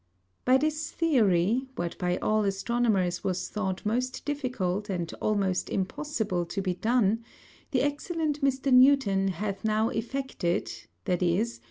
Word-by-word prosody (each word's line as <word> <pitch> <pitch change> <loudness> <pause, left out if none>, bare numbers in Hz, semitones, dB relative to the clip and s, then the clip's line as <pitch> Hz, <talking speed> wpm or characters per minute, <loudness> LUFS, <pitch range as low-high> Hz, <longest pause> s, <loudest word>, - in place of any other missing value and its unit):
By 255 +1 +6
this 310 +2 -1
Theory, 235 - +2
what 170 -1 -3
by 180 0 0
all 215 0 +1
Astronomers 195 -2 0
was 185 -1 -2
thought 190 -3 -3
most 250 +4 -1
difficult 215 -9 -2
and 175 -3 -3
almost 195 -4 0
impossible 200 -2 -2
to 195 - -4
be 190 -2 0
done, 225 +2 +1 0.5
the 260 - +1
Excellent 300 +1 -1
Mr. 270 -1 +1
Newton 250 -7 +5
hath 195 +1 -3
now 220 +1 +2
effected; 230 -7 -2 0.3
_viz. 180 +6 0
215 Hz, 130 wpm, -28 LUFS, 190-260 Hz, 0.5 s, By